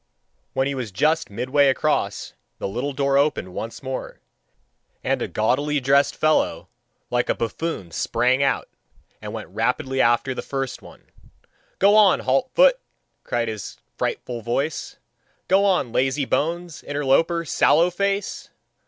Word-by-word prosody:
When 130 - +1
he 140 - -1
was 125 -6 -4
just 155 - +1
midway 130 +7 +2
across, 150 +3 0 0.2
the - - -3
little 125 +8 -3
door 140 0 +2
opened 140 -11 0
once 115 +6 -6
more, 130 -1 -5 0.8
and - - 0
a - - -1
gaudily 145 +7 0
dressed 140 +2 +3
fellow 155 0 +1 0.4
like 120 0 0
a - - +2
buffoon 115 - -4
sprang 125 - +1
out, 140 - +1 0.5
and - - -6
went - - -7
rapidly 125 +6 0
after 120 +3 +2
the - - -4
first 135 -2 -4
one. - - -15 0.7
"Go 200 +2 +5
on, 210 -3 +5
halt 135 - +1
foot," - - +5 0.4
cried 120 -1 -1
his 110 -3 -6 0.2
frightful 120 -2 -3
voice, 135 +7 -3 0.5
"go 195 +1 +4
on, 180 -11 +1
lazy 135 +3 +1
bones, 170 +4 -2
interloper, 145 +4 +1
sallow 160 +3 +3
face! 200 +2 -2
140 Hz, 140 wpm, -23 LUFS, 125-160 Hz, 0.8 s, Go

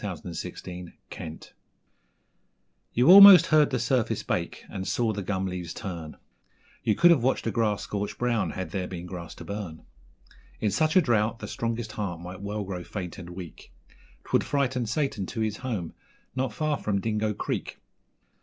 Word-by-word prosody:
Marshall's 90 -3 -5 0.2
Mate 90 -3 -9 1.4
You 125 +4 +2
almost 200 -1 +11
heard 155 -2 +4
the 130 - 0
surface 120 0 0
bake, - - -3
and 95 -1 -6
saw 115 -3 0
the 100 - -4
gum 95 0 -2
leaves 90 -3 -5
turn 85 -6 -6 0.7
You 110 -3 +2
could 175 0 +6
have 155 -7 +4
watched 130 +3 +1
the - - -1
grass 110 -3 0
scorch 105 0 -4
brown 120 -3 0
had 95 - -5
there 95 -2 -2
been 90 -1 -7
grass 85 -2 -8
to - - -10
burn. 100 -6 -6 0.8
In 105 - 0
such 155 +10 +1
a 185 - +7
drought 115 -5 +1
the - - -7
strongest 115 -1 -3
heart 95 -6 -4
might 90 +2 -8
well 105 +1 -3
grow 95 -2 -5
faint 90 -2 -6
and 90 -1 -9
weak 90 -2 -10 0.5
'Twould - - +1
frighten 130 -4 0
Satan 120 -6 -1
to 115 - -4
his 110 -1 -1
home 110 -10 -4 0.4
not 130 -2 -1
far 150 +6 -1
from 100 -2 -1
Dingo 105 0 -1
Creek. - - -4
105 Hz, 170 wpm, -27 LUFS, 90-120 Hz, 1.4 s, almost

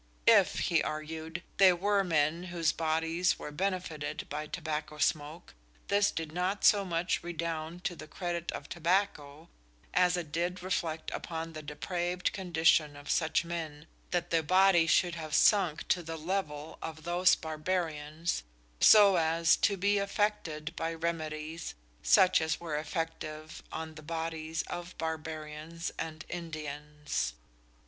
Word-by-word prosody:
If, - - +6
he - - +4
argued, 160 +2 -5
there 185 -2 +7
were 200 +2 +2
men 165 0 +1
whose 170 -2 +1
bodies 165 +2 +1
were 150 - -7
benefited 180 -3 -3
by 150 +1 -3
tobacco 155 -2 -4
smoke, 155 +2 -1 0.4
this 200 0 +4
did 160 -2 -4
not 180 +4 -1
so 205 -1 +6
much 175 -1 -1
redound 170 0 -4
to 175 - -2
the 155 -1 -10
credit 170 0 -3
of 145 - -6
tobacco, 170 -3 -1 0.5
as 180 0 +4
it 165 -4 -5
did 175 +3 -2
reflect 165 -4 -2
upon 165 0 -5
the 155 - -6
depraved 175 +4 -2
condition 165 -5 +2
of 145 - -5
such 160 0 +2
men, 160 -3 -5 0.2
that 175 -1 -1
their 165 -1 +3
bodies 185 0 +5
should 175 +1 +3
have 155 -2 -4
sunk 185 -7 +4
to 180 - +3
the 165 -1 -6
level 155 -3 -3
of 160 -1 -6
those 175 +2 +4
of - - -18
Barbarians 160 - -2 0.4
so 200 -3 +8
as 165 0 +4
to 200 -2 +2
be 200 +2 +2
affected 195 -6 -1
by 165 0 -2
remedies 160 -1 -4 0.3
such 185 -2 +5
as 160 0 0
were 165 -3 -4
effective 155 0 -4
on 160 0 -5
the 155 - -10
bodies 160 0 -3
of 175 +1 -7
Barbarians 160 0 -5
and 155 0 -5
Indians! 150 - -4
165 Hz, 140 wpm, -31 LUFS, 155-175 Hz, 0.5 s, so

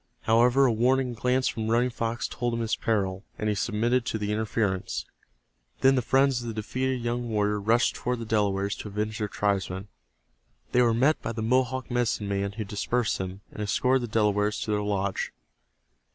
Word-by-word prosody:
However, 120 +4 +4
a 125 - +4
warning 125 +2 +2
glance 125 +3 +1
from 110 -1 -2
Running 120 +2 +2
Fox 115 0 -2
told 120 -1 -2
him 115 - -2
his 115 -1 0
peril, 100 -4 -1
and 110 - -2
he - - +2
submitted 115 +4 +1
to 110 - -1
the 105 -1 -2
interference. 105 -3 -1 0.8
Then 135 0 +6
the 130 - +2
friends 135 +1 +2
of 120 - -6
the 115 - -4
defeated 130 +4 -2
young 120 0 -2
warrior 105 -1 +1
rushed 115 +4 +3
toward 125 0 -2
the 115 - -6
Delawares 100 -2 0
to - - -7
avenge 105 +1 -3
their 105 - -1
tribesman. 100 -1 -1 0.8
They 125 - +4
were 115 -2 +3
met 135 +6 +3
by - - -3
the 110 -1 -3
Mohawk 130 +2 +1
medicine 120 -4 0
man 100 0 -1
who 110 +1 -4
dispersed 105 +3 -1
them, 95 +1 -5
and - - -7
escorted 125 +5 +2
the 120 -3 -5
Delawares 105 -1 +2
to 110 - -2
their 105 0 +1
lodge. 100 -2 -1
110 Hz, 190 wpm, -27 LUFS, 105-120 Hz, 0.8 s, Then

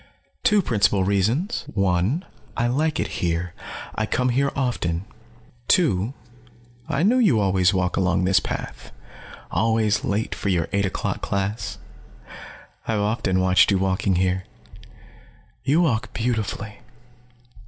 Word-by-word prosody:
"Two 210 -5 +4
principal 100 - +2
reasons. 110 - 0
One, 95 - 0 0.3
I 120 - +1
like 150 +6 0
it - - +1 0.2
here; 85 0 -1 0.4
I 110 - -2
come 125 +3 +1
here 140 +3 +1
often. 100 -10 -1 0.6
Two, 130 - +2 0.7
I 150 0 0
knew 240 +6 +4
you 195 - +4
always 95 -2 +3
walk 90 -2 0
along 90 -1 +2
this 95 +1 +4
path, - - -6 0.6
always 110 -2 +1
late 105 +2 -1
for 100 - -3
your 85 -4 +1
eight 100 -1 +2
o'clock - - -3
class. 100 +2 -2 1.1
I've 110 - 0
often 105 -3 0
watched 95 -1 +4
you 100 - +3
walking 95 0 +1
here. 95 +1 0 1.2
You 145 +6 +3
walk 125 -10 0
beautifully." 110 -3 -2
105 Hz, 125 wpm, -23 LUFS, 95-125 Hz, 1.2 s, Two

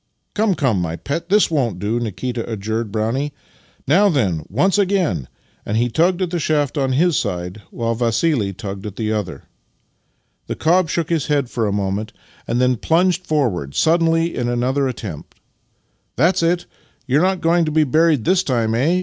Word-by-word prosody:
"Come, 210 -3 +1
come, 125 - +1
my 85 -1 -2
pet; 165 - -4
this 205 -2 +4
won't 125 - 0
do," 105 +5 -1
Nikita 120 +1 -4
adjured 110 +1 -3
Brownie. 115 +7 -1 0.5
"Now 195 +9 +5
then, 100 - 0
once 185 - +2
again!" 180 - +1 0.4
and 105 - -2
he 120 +1 +1
tugged 175 +8 +2
at 175 - -3
the 175 - -1
shaft 150 -2 0
on 135 -3 0
his 165 +4 +3
side, 90 -2 -3
while 115 -1 -2
Vassili 115 -1 +1
tugged 100 0 -7
at 105 - -8
the 110 -1 -1
other. 95 -9 -4 1.0
The - - -3
cob 170 +1 +2
shook 170 -1 -2
his 160 -5 0
head 140 -4 0
for 115 -3 0
a - - -1
moment, 100 +1 -2
Master - - -29
and 120 +1 0
Man 125 0 +3
37 - - +2
and - - +3
then - - -12
plunged 180 +2 +2
forward 105 - -1
suddenly 165 0 +2
in 120 -1 -1
another 130 +3 0
attempt. 105 - -7 0.8
"That's 170 +8 +2
it! 170 +1 +1 0.4
You're 140 +3 +2
not 190 0 +1
going 170 +1 +3
to 155 - -2
be 155 +1 +3
buried 155 -3 +2
this 185 -1 +3
time, 115 -7 0
eh? 155 +10 +2
130 Hz, 190 wpm, -20 LUFS, 110-165 Hz, 1.0 s, Now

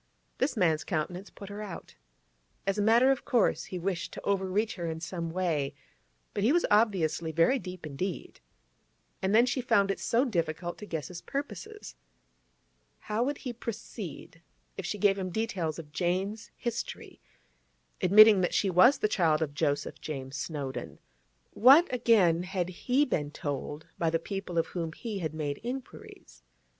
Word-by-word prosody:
This 260 -1 0
man's 160 -6 +2
countenance 180 +3 -3
put 200 - -11
her 205 +1 -6
out. 200 -5 -8 0.7
As 195 +1 0
a - - +3
matter 235 +5 +5
of 270 - -1
course, 240 -6 +2
he 185 - -6
wished 180 0 -3
to - - -7
overreach 200 +2 0
her 170 -2 -4
in 160 0 -4
some 170 0 -4
way, 165 -5 -1 0.6
but 200 - -1
he 230 - +4
was 345 +2 +3
obviously 185 -7 +2
very 170 - +3
deep 180 -5 -8
indeed. 160 +5 -5 0.8
And 190 +2 +1
then 235 +2 +7
she 255 +1 -1
found 200 -5 +3
it - - -4
so 240 +4 +2
difficult 170 - -2
to 210 - -8
guess 160 -5 -4
his 175 -2 -8
purposes. 230 - -6 1.0
How 215 +2 -3
would 280 +4 0
he 250 - -3
proceed 205 - -7 0.3
if 190 - -5
she 210 - -3
gave 200 0 +3
him 185 -1 -3
details 180 -6 -2
of 155 -3 -9
Jane's 190 +6 -2
history, 235 -1 -5 0.8
admitting 210 +1 +8
that 180 - 0
she 195 - +2
was 210 +11 +6
the 215 - +1
child 165 -6 +2
of 145 -2 -4
Joseph 145 0 -1
James 135 -3 -6
Snowdon? 140 -2 -5 0.5
What, 275 +9 +7
again, 195 -9 +4
had 180 -1 -2
he 250 +10 +1
been 150 - -1
told 145 +1 -5
by 165 - +2
the 165 - +1
people 195 0 -5
of 165 - +3
whom 165 -3 -3
he 215 +1 -5
had 160 -3 -3
made 145 -2 -3
inquiries? 240 - -8
185 Hz, 165 wpm, -29 LUFS, 165-215 Hz, 1.0 s, admitting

